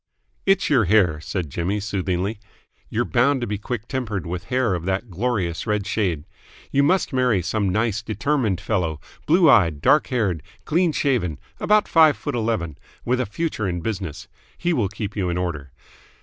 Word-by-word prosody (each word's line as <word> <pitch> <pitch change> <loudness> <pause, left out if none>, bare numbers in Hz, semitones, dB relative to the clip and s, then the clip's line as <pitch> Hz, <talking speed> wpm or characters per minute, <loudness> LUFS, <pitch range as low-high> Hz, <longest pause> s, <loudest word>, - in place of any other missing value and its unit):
"It's 195 -1 +3
your 125 -8 +3
hair," 90 -5 +3
said 85 -3 -4
Jimmy 90 +7 -1
soothingly. 100 0 -2 0.5
"You're 120 +2 0
bound 135 +3 +2
to - - 0
be 105 -2 -3
quick 115 +1 -5
tempered 115 -8 -3
with 90 +2 -5
hair 125 -4 +1
of 85 -2 -3
that 95 +3 -2
glorious 95 -3 -1
red 105 -2 0
shade. 90 -8 -1 0.5
You 140 - +3
must 175 +2 +2
marry 125 -8 +2
some 100 +2 0
nice, 110 +2 0
determined 110 - 0
fellow, 90 -6 -1 0.3
blue 170 +2 +5
eyed, 85 - +5
dark 150 - +4
haired, 105 - 0 0.2
clean 170 +1 +2
shaven, 120 - 0 0.2
about 210 0 +3
five 160 -3 +5
foot - - -4
eleven, 110 - -2 0.3
with 125 +1 +1
a 125 - -1
future 110 -3 -2
in 90 -1 -3
business. 95 -6 -4 0.3
He 175 0 0
will 110 - +1
keep 105 0 -5
you 95 -4 -1
in 85 - -1
order." 75 -7 -3
105 Hz, 175 wpm, -23 LUFS, 90-125 Hz, 0.5 s, blue